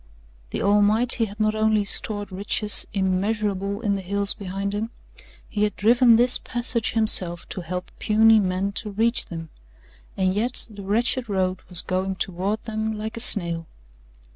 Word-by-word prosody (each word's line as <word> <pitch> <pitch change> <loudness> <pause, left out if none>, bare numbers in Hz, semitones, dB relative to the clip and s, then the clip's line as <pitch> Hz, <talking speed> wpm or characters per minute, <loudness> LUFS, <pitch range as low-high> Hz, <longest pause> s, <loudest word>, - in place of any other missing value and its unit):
The - - -4
Almighty 215 +4 +2
had 210 0 -12
not 215 0 +1
only 215 -1 +1
stored 205 0 -2
riches 205 +2 +4
immeasurable 200 +1 -2
in 210 -4 0
the 195 - -3
hills 200 +2 0
behind 195 0 -5
him 215 +2 -3 0.6
He 210 - -4
had 210 -1 0
driven 235 +2 +4
this 245 +2 +3
passage 240 -2 +1
Himself 185 -6 +5
to 185 - -5
help 180 +2 -6
puny 220 +1 +4
man 190 0 -2
to 210 - -8
reach 225 +4 -1
them, 165 -2 -8 0.7
and 185 -1 +1
yet 235 +5 -2
the 205 -1 -10
wretched 230 +4 -1
road 185 -2 -1
was 180 -3 +1
going 190 +1 -2
toward 190 +4 -3
them 220 0 -4
like 220 +1 -6
a - - -6
snail. 170 -8 0
205 Hz, 160 wpm, -23 LUFS, 190-220 Hz, 0.7 s, Himself